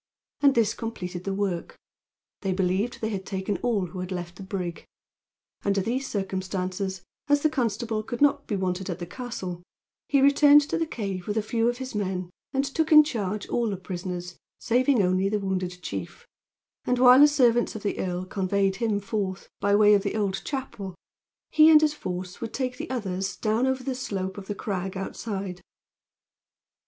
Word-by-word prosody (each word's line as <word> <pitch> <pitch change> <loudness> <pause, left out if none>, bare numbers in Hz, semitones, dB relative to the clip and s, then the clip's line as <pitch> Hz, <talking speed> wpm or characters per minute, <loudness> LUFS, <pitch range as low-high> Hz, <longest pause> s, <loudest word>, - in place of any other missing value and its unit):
And 280 -2 +5
this 225 -2 +3
completed 180 -6 -5
the 195 - -1
work. 195 -4 -2 0.6
They 195 -2 0
believed 190 +5 0
they 220 - -1
had 195 -2 -3
taken 190 +1 -2
all 225 -6 0
who 180 +2 -8
had 180 +1 -5
left 175 -1 -5
the - - -9
brig. 185 -3 -4 0.8
Under 200 -1 +1
these 250 +7 -1
circumstances, 190 -1 -3 0.2
as 290 0 +3
the 310 - +3
constable 225 -4 -1
could 235 +2 -6
not 290 -1 +3
be 210 - -1
wanted 185 -1 -2
at - - -3
the 175 - -5
castle, 185 -4 -6 0.5
he 280 - +4
returned 285 +1 +7
to 290 - -2
the 325 - 0
cave 195 - -4
with 210 +1 -1
a 220 - +1
few 230 +2 +1
of 240 - -2
his 260 0 -6
men 185 -3 -2 0.2
and 270 +1 +1
took 315 +4 -1
in 305 -1 +10
charge 210 -8 -3
all 235 -2 +1
the 195 - -3
prisoners, 180 -1 -6 0.2
saving 250 -1 +2
only 185 +1 +2
the 210 - +1
wounded 185 -2 -2
chief; 95 - -6 0.6
and 250 - +1
while 250 +1 +8
the 295 - +9
servants 245 -6 +3
of 220 - -6
the 205 - -2
earl 180 0 -2
conveyed 195 0 0
him 220 -2 0
forth, 200 -2 -3
by 200 0 +3
way 210 0 +6
of 200 - +4
the 200 +1 -2
old 200 -3 -1
chapel, 220 -9 -5 0.6
he 310 +1 +7
and 310 -1 +8
his 305 -1 +3
force 180 -8 -6
would 230 -1 -5
take 255 -2 -2
the - - -6
others 195 -6 -2
down 225 +4 +1
over 265 -1 -1
the 265 - -2
slope 195 -6 -4
of 190 - -11
the 205 - -3
crag, 190 -2 -3
outside. 195 -2 -5
200 Hz, 190 wpm, -26 LUFS, 185-245 Hz, 0.8 s, in